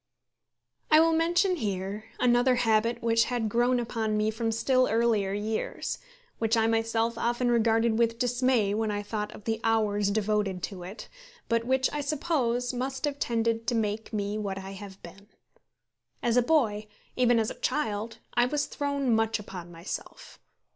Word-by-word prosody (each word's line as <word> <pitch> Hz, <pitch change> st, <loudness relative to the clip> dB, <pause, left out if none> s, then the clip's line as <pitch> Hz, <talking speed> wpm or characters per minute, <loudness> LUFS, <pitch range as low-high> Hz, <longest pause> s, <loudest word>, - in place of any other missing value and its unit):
I 310 Hz, -, +7 dB
will 330 Hz, +1 st, +5 dB
mention 345 Hz, +3 st, +2 dB
here 200 Hz, -, -3 dB
another 245 Hz, +1 st, +4 dB
habit 230 Hz, 0 st, +1 dB
which 230 Hz, 0 st, +3 dB
had 240 Hz, -3 st, -1 dB
grown 240 Hz, +3 st, +2 dB
upon 225 Hz, -2 st, -1 dB
me 215 Hz, +1 st, +1 dB
from 225 Hz, +1 st, -2 dB
still 255 Hz, +3 st, +2 dB
earlier 225 Hz, -4 st, +2 dB
years, 210 Hz, +2 st, -3 dB, 0.4 s
which 225 Hz, 0 st, +2 dB
I 225 Hz, -, +3 dB
myself 225 Hz, 0 st, 0 dB
often 240 Hz, +1 st, +1 dB
regarded 225 Hz, -1 st, +2 dB
with 230 Hz, -1 st, +2 dB
dismay 245 Hz, -4 st, +1 dB
when 220 Hz, +1 st, 0 dB
I 205 Hz, 0 st, -2 dB
thought 210 Hz, 0 st, -4 dB
of -, -, -12 dB
the 225 Hz, 0 st, -2 dB
hours 210 Hz, -3 st, +2 dB
devoted 205 Hz, -3 st, 0 dB
to 190 Hz, -3 st, -5 dB
it, 185 Hz, +5 st, -8 dB, 0.4 s
but 230 Hz, 0 st, +1 dB
which, 260 Hz, +1 st, +2 dB
I 295 Hz, -, -1 dB
suppose, 260 Hz, -5 st, 0 dB
must 260 Hz, +3 st, -2 dB
have 285 Hz, -1 st, -3 dB
tended 230 Hz, -2 st, 0 dB
to 245 Hz, -, +1 dB
make 220 Hz, 0 st, -2 dB
me 205 Hz, 0 st, -2 dB
what 200 Hz, -2 st, -3 dB
I 195 Hz, 0 st, -7 dB
have 195 Hz, 0 st, -10 dB
been. 195 Hz, +4 st, -13 dB, 1.0 s
As 235 Hz, -1 st, +2 dB
a 245 Hz, -, +6 dB
boy, 230 Hz, -7 st, +1 dB, 0.3 s
even 245 Hz, -1 st, +3 dB
as 220 Hz, -1 st, +1 dB
a -, -, -10 dB
child, 225 Hz, -6 st, -2 dB, 0.2 s
I 240 Hz, 0 st, +3 dB
was 290 Hz, +2 st, 0 dB
thrown 280 Hz, -3 st, -1 dB
much 225 Hz, 0 st, +1 dB
upon 180 Hz, -4 st, -9 dB
myself. 170 Hz, +3 st, -8 dB
225 Hz, 170 wpm, -28 LUFS, 210-245 Hz, 1.0 s, I